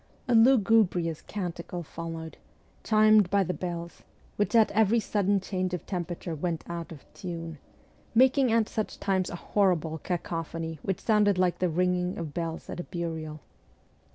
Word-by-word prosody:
A 245 - +2
lugubrious 220 - +4
canticle 175 -3 -5
followed, 165 0 -7 0.5
chimed 215 -3 +5
by 200 0 +3
the 180 - -2
bells, 170 -2 -5 0.3
which 205 +3 0
at 225 -2 +5
every 220 +2 +3
sudden 205 -2 +1
change 185 -1 -2
of 180 - -8
temperature 175 -2 -4
went 165 +1 -3
out 170 -1 -5
of 150 -4 -11
tune, 165 -5 -6 0.6
making 260 +1 +5
at 225 -1 +3
such 215 - -4
times 190 -2 0
a - - -5
horrible 175 -4 0
cacophony 165 -2 -4
which 195 - -2
sounded 210 -3 +3
like 180 -1 +1
the 180 - +1
ringing 180 +2 0
of 170 - -3
v 150 - -8
bells 165 +1 -4
at - - -6
a - - -3
burial. 160 -4 -5
180 Hz, 155 wpm, -28 LUFS, 165-205 Hz, 0.6 s, chimed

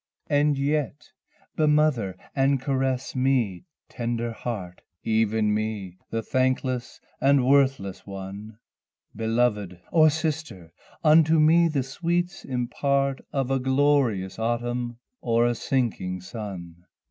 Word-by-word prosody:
And 145 0 +3
yet 145 +1 -2 0.4
bemother 150 - +2 0.2
and 135 0 +2
caress 130 -1 -1
me, 130 - +1 0.2
tender 120 -1 -3
heart! 100 -6 -6 0.2
Even 110 -1 +1
me 105 -4 -3
the 115 0 -2
thankless 130 0 -1 0.2
and 140 +1 +5
the 130 - +2
worthless 135 -8 +2
one; 100 +2 -8 0.6
Beloved 110 -5 0
or 155 -1 +6
sister 150 - -4 0.3
unto 160 +1 +5
me 165 +2 +5
the 145 -5 0
sweets 175 +6 -2
impart 135 +2 0
Of 135 -2 -1
a 135 - +2
glorious 130 -8 +1
autumn 120 +1 -2 0.2
or 115 0 +2
a 120 - +2
sinking 115 -8 -2
sun. 90 -4 -8
125 Hz, 110 wpm, -25 LUFS, 110-140 Hz, 0.6 s, or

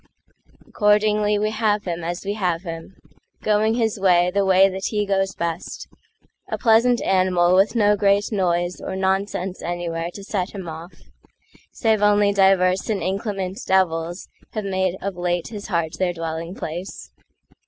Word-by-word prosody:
Accordingly 210 0 +2
we 215 +1 0
have 215 -2 0
him 170 -2 -4
as 175 +3 -4
we 200 - -1
have 180 -4 -1
him—Going 205 +5 -3
his 225 -3 0
way, 180 -2 +3
the 200 0 +2
way 190 0 +5
that 190 0 -5
he 210 -1 0
goes 195 -1 0
best,A 170 +1 -7
pleasant 235 +1 +3
animal 185 -2 +2
with 195 +5 +3
no 210 -2 +4
great 200 0 +3
noiseOr 180 -1 -1
nonsense 190 -1 -1
anywhere 170 -1 -3
to 200 - -8
set 195 -1 -3
him 190 -3 -6
off—Save 180 +6 -5
only 205 -1 +4
divers 190 -1 +3
and 200 -5 -1
inclement 195 0 -3
devilsHave 175 -2 0 0.4
made 190 -1 -1
of 195 -2 -4
late 175 -1 -1
his 210 -3 -7
heart 170 -5 -1
their 180 -2 +1
dwelling 165 +1 -5
place. 175 +3 -7
190 Hz, 140 wpm, -22 LUFS, 175-205 Hz, 0.4 s, way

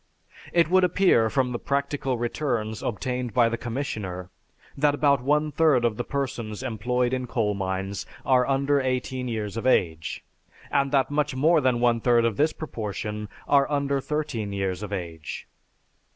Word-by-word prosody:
It 170 -2 +4
would 185 +2 +4
appear 180 -11 +4
from 130 +1 +1
the 120 - -3
practical 140 -2 -1
returns 120 -3 -2
obtained 125 +2 -3
by 120 -2 +5
the 115 - -1
commissioner, 105 -8 -4 0.4
that 145 +1 +2
about 140 -3 +3
one 150 +3 +1
third 145 -5 +3
of 115 -2 +1
the - - -1
persons 125 -5 -4
employed 125 +1 0
in 130 -1 -2
coal 110 -3 0
mines 95 0 -3 0.2
are 125 -2 +4
under 140 +1 +2
eighteen 130 0 -2
years 110 -3 -3
of 115 - -1
age, 80 -10 +1 0.5
and 140 -1 +2
that 135 -1 +2
much 145 -2 0
more 155 +4 +4
than 125 -3 +2
one 120 -1 +2
third 120 -1 +4
of 115 -3 +1
this 155 +2 +3
proportion 105 -6 -5 0.2
are 140 -1 +4
under 140 -1 0
thirteen 140 -9 -3
years 95 -1 -2
of 105 -1 -6
age." 85 -5 -6
125 Hz, 165 wpm, -25 LUFS, 110-140 Hz, 0.5 s, by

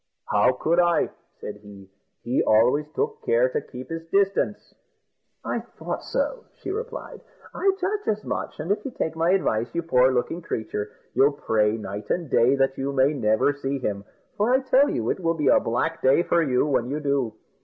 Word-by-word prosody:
"How 105 +5 +3
could 165 +7 +1
I?" 175 -1 +3 0.3
said 105 - -7
he; 100 -2 -14 0.4
"he 120 +2 +1
always 125 +7 +3
took 450 +1 -2
care - - +3
to 465 -2 -2
keep 125 - -10
his 165 0 -4
distance." 200 +2 0 0.7
"I - - -1
thought - - -6
so," - - -2
she - - -6
replied; 460 +4 -6 0.3
"I 390 - +2
judged 410 +3 -2
as 215 0 0
much; - - -4
and 160 +6 -2
if 205 - 0
you 275 - -4
take 160 -10 -3
my 165 +1 +1
advice, 120 - +1
you 170 - 0
poor 130 -5 +4
looking 130 +7 -1
creature, 105 -8 -4 0.2
you'll 135 +3 +4
pray 110 -5 +1
night 105 -1 -7
and 170 -6 -2
day 125 +4 +4
that 135 0 0
you 135 +1 -1
may 135 +2 +3
never 110 +1 +2
see 140 0 -3
him, 105 -6 -3 0.3
for 210 +4 +2
I 260 +1 +4
tell 265 +2 +4
you 115 0 -1
it - - -3
will 165 -2 0
be 150 -4 +1
a - - +6
black 140 +8 -1
day 135 +6 +4
for 170 - +2
you 130 -4 +2
when 130 -5 0
you 145 +2 -2
do. 140 -6 -1
145 Hz, 195 wpm, -24 LUFS, 120-190 Hz, 0.7 s, a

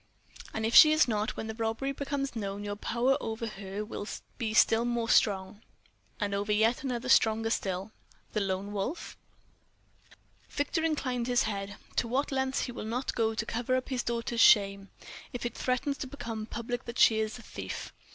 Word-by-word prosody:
"And 220 - -2
if 225 - -1
she 305 - +10
is 310 -2 +4
not, 215 -2 -1
when - - -3
the 220 - -4
robbery 225 +4 -2
becomes 275 -1 -3
known, 200 -2 -4
your 205 0 -3
power 245 +6 +1
over 225 +1 -3
her 200 -1 -5
will 210 -1 -6 0.3
be 225 -3 -1
still 225 +1 +4
more 240 -1 -1
strong?" 195 0 +2 0.6
"And 205 -1 -1
over 200 +1 -1
yet 220 +3 +3
another 255 -2 -3
stronger 225 -3 +4
still." 190 0 -2 0.4
"The 215 - +1
Lone 195 +1 -2
Wolf?" 210 - -4 1.3
Victor 305 +3 -1
inclined 255 -7 -1
his 245 -1 +3
head. 200 -1 -3 0.2
"To 240 - +2
what 265 +5 0
lengths 265 0 0
will 245 - -6
he 215 - -5
not 250 +3 -2
go 225 -1 0
to 225 - -2
cover 240 +3 -1
up 255 - -2
his 255 -2 0
daughter's 235 0 -1
shame, 195 -1 +5 0.4
if 245 - -4
it 240 - -2
threatens 260 +2 -1
to - - -4
become 230 -5 -6
public 240 +2 -4
that 235 - -6
she 220 -1 +6
is 220 +1 -2
a 240 - -13
thief? 95 - -7
225 Hz, 185 wpm, -30 LUFS, 210-250 Hz, 1.3 s, she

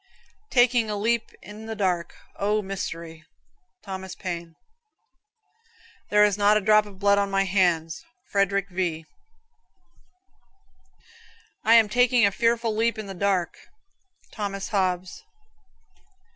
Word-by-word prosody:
"Taking 245 -3 +3
a 210 - -2
leap 230 +3 0
in 215 +2 -10
the 220 - -5
dark. 180 -4 -1 0.2
O, 210 +1 0
mystery." 165 -4 -6 0.6
Thomas 190 -2 -7
Paine. 170 -3 -6 1.5
"There 210 0 +5
is 205 -1 0
not 205 +1 +5
a - - 0
drop 210 +1 +4
of 200 -2 -13
blood 200 +1 +3
on 200 0 0
my 195 0 +1
hands."' 175 -4 0 0.3
Frederick 200 0 +1
V. 175 -3 -2 2.6
"I 225 +1 +5
am 225 -2 +6
taking 245 +1 +3
a 200 - +2
fearful 230 +1 0
leap 230 +1 +1
in 215 - -5
the 195 - -7
dark." 190 -2 -1 0.7
Thomas 195 -2 -4
Hobbes. 185 -2 -2
200 Hz, 120 wpm, -25 LUFS, 185-215 Hz, 2.6 s, am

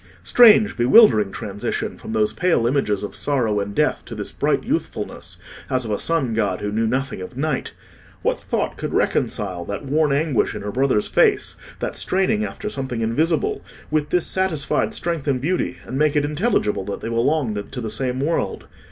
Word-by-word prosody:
Strange, 220 -3 +6
bewildering 120 - +6
transition 105 -3 -4
from - - -9
those 110 -1 +1
pale 165 -2 +1
images 120 -6 +1
of 105 - -5
sorrow 120 -8 0
and 100 0 -4
death - - +1
to - - -8
this - - -5
bright - - 0
youthfulness, - - -4 0.3
as 130 -1 0
of 110 - -4
a 105 - -1
sun 155 -8 0
god 100 -5 0
who 105 - -3
knew 110 +2 0
nothing 130 -3 -2
of 90 +7 -9
night! 150 -1 -2 0.5
What - - 0
thought - - -2
could - - -4
reconcile 95 -4 0
that 100 +9 -5
worn 150 +2 +2
anguish 145 -2 +1
in - - -6
her 105 - -3
brother's 130 -3 +1
face—that - - 0
straining 195 +3 +1
after 210 - -5
something 130 - -3
invisible—with 155 - -1
this 180 -2 +1
satisfied 185 -7 0
strength 165 -4 -2
and 135 -3 +1
beauty, 175 +7 -1
and 130 - -4
make 150 0 +2
it 145 -1 +2
intelligible 150 - 0
that 100 - -5
they - - -4
belonged 115 -3 0
to 130 - -5
the 110 -3 -4
same 125 +3 -2
world? 145 - -1
130 Hz, 180 wpm, -22 LUFS, 110-155 Hz, 0.5 s, Strange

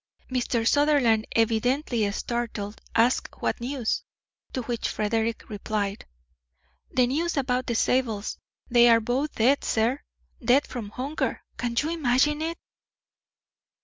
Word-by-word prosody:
Mr. 240 -2 0
Sutherland, 280 -7 +3
evidently 230 0 +1
startled, 225 -2 -4
asked 235 +3 +2
what - - -1
news; 245 -2 -1 0.5
to 255 - -3
which 235 0 -2
Frederick 225 +2 -1
replied: 205 -1 -3 0.8
"The 250 - +3
news 310 +6 -1
about 255 -2 0
the 235 - -1
Zabels. 225 -4 0 0.3
They 240 0 +6
are 230 -1 +6
both 255 +7 -1
dead, 260 +6 +3
sir, 235 +5 +1 0.4
dead 255 +5 +4
from 230 -5 -6
hunger. 265 +7 -3
Can 240 -1 -2
you 310 +3 -1
imagine 295 -1 +2
it!" 330 +1 -2
245 Hz, 120 wpm, -26 LUFS, 225-270 Hz, 0.8 s, They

